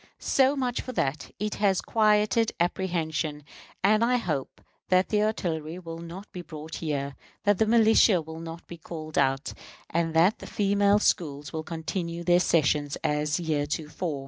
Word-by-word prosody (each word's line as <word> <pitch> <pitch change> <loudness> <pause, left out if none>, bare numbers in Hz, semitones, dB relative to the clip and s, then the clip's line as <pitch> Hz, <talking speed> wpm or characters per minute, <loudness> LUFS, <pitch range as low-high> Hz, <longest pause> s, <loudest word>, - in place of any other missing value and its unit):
So 270 +1 +3
much 255 -3 -1
for 255 - -7
that. 140 - -1
It 210 +1 -2
has 195 -3 +3
quieted 215 0 +2
apprehension; 165 -4 -1 0.4
and 215 +3 +4
I 250 +1 +3
hope 155 - -3 0.3
that 185 0 +3
the 210 -1 +2
artillery 170 -7 -2
will 165 -2 -8
not 170 +5 -9
be 180 - -6
brought 160 -2 -8
here; 140 -3 -3 0.3
that 205 -2 +3
the 220 - +3
militia 220 -3 +5
will 160 0 -8
not 165 0 -8
be 170 - -9
called 155 -1 -8
out; 135 +1 +1 0.4
and 165 -1 0
that 175 +6 +4
the - - -9
female 200 0 +3
schools 145 -8 0
will 160 - -2
continue 170 +1 -4
their 175 0 +4
sessions 150 -4 +2
as 150 0 0
heretofore. 155 -1 -2
170 Hz, 160 wpm, -27 LUFS, 155-205 Hz, 0.4 s, militia